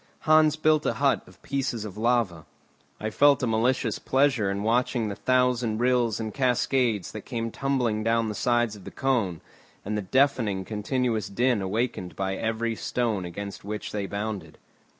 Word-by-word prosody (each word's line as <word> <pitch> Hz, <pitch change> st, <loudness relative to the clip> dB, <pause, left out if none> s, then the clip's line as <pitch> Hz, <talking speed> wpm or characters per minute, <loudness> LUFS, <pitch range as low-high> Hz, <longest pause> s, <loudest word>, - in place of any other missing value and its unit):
Hans 155 Hz, -1 st, +5 dB
built 155 Hz, -1 st, +3 dB
a -, -, +1 dB
hut -, -, +2 dB
of -, -, -18 dB
pieces 130 Hz, -5 st, -2 dB
of 100 Hz, -3 st, -7 dB
lava. 110 Hz, -8 st, 0 dB, 0.5 s
I 110 Hz, +1 st, -3 dB
felt 145 Hz, +3 st, +4 dB
a -, -, +3 dB
malicious 115 Hz, 0 st, +1 dB
pleasure 130 Hz, -6 st, +2 dB
in 100 Hz, +1 st, -2 dB
watching 115 Hz, 0 st, +1 dB
the 100 Hz, -, -4 dB
thousand 125 Hz, -3 st, +1 dB
rills 120 Hz, -2 st, +2 dB
and 110 Hz, -2 st, -4 dB
cascades 125 Hz, -5 st, +1 dB
that 110 Hz, -, -7 dB
came 115 Hz, -1 st, -4 dB
tumbling 125 Hz, -6 st, 0 dB
down 115 Hz, 0 st, +2 dB
the 105 Hz, -, -3 dB
sides 120 Hz, 0 st, +1 dB
of 100 Hz, -, -13 dB
the -, -, -7 dB
cone, 115 Hz, -, -1 dB, 0.4 s
and 105 Hz, +2 st, -2 dB
the 105 Hz, -, -1 dB
deafening 110 Hz, -3 st, +1 dB
continuous 110 Hz, +2 st, -1 dB
din 120 Hz, +1 st, +1 dB
awaked 100 Hz, -2 st, -2 dB
by 95 Hz, 0 st, -2 dB
every 115 Hz, +2 st, -1 dB
stone 110 Hz, -4 st, -1 dB
against 100 Hz, +3 st, -7 dB
which 105 Hz, +1 st, -5 dB
they 100 Hz, -2 st, -3 dB
bounded. 100 Hz, -6 st, -5 dB
115 Hz, 170 wpm, -26 LUFS, 105-125 Hz, 0.5 s, Hans